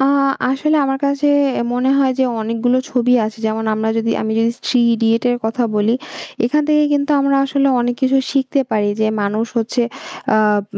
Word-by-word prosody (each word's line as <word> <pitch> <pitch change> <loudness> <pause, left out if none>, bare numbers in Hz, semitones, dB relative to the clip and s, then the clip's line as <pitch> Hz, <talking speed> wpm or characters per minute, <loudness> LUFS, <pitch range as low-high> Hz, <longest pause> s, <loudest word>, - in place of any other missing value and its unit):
আ 270 - +3 0.5
আসলে 305 +4 +1
আমার 270 0 -1
কাছে 280 +1 0 0.5
মনে 250 +2 0
হয় 265 -2 +2
যে - - +3 0.2
অনেকগুলো 230 +3 0
ছবি 250 0 +1
আছে 220 +1 -6
যেমন 220 +1 -2
আমরা 220 +1 -2
যদি 225 0 -1
আমি 220 - -2
যদি 230 +1 +2 0.2
'3 250 -2 +3
Idiots' 225 +1 +1
এর 245 - 0
কথা 225 +3 -1
বলি। 210 +2 +1 0.5
এখান 300 +6 +1
থেকে 300 0 +3
কিন্তু 285 0 0
আমরা 275 0 +2
আসলে 275 0 +1
অনেক 245 0 -1
কিছু 265 +1 +3
শিখতে 275 0 0
পারি। 210 -2 0
যে 215 - +2 0.2
মানুষ 210 +3 -1
হচ্ছে 235 +2 -1 0.5
আব 210 -1 +2
245 Hz, 185 wpm, -17 LUFS, 220-270 Hz, 0.5 s, আ